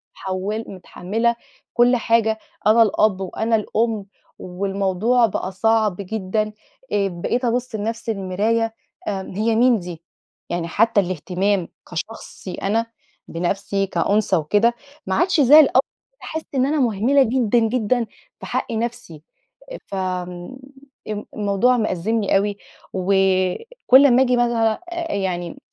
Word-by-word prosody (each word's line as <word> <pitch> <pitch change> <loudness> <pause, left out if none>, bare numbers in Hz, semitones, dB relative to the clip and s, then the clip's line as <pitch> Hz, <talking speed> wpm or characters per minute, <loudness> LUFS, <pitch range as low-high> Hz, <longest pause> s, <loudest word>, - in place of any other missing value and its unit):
متحول 195 +4 -4
متحمّلة 205 +5 -2 0.4
كُل 245 +1 +4
حاجة، 230 -2 +1 0.3
أنا 220 +2 +6
الأب 210 -2 +1
وأنا 220 +4 -1
الأم، 220 0 -1 0.3
والموضوع 195 +5 +1
بقى 190 -2 -3
صعْب 215 +1 +2
جدًا، 215 +1 -2 0.4
آآ، 200 -1 +2
بقيت 195 +8 -2
أبص 245 0 -1
لنفْسي 225 +2 -3
المراية 220 +3 -1 0.3
آمم 190 -2 -5
"هي 220 +2 +1
مين 240 0 +4
دي؟!" 175 -2 -9 0.5
يعني 175 -1 -2
حتّى 220 +5 +2
الاهتمام 185 +1 -1 0.2
كشخصي 185 +1 -7
أنا 225 +4 0 0.4
بنفْسي 195 +3 -2
كأنثى 195 +3 +1
وكده، 205 +9 +2 0.3
ما 190 - 0
عادش 350 -1 +2
زي 285 +4 +8
الأول، 300 - +6 0.4
بقيت - - -47
باحسّ 320 0 -5
إن 260 -1 +3
أنا 300 +2 0
مهمِلة 250 +3 +3
جدًا، 240 -1 +2
جدًا 230 +1 +1 0.3
في - - -8
حق - - -3
نفْسي، 225 -9 -4 0.5
أ - - -6
فآمم، 180 +3 -4 0.5
امم 210 -1 -4
الموضوع 210 +4 +2
مأزّمني 215 0 0
أوي، 200 +1 -1 0.4
وكُل 195 - +3
أمّا 255 -2 +5
آجي 250 -1 +3
مثلًا 230 -1 +1 0.3
يعني 175 -3 -3
215 Hz, 125 wpm, -21 LUFS, 190-235 Hz, 0.5 s, زي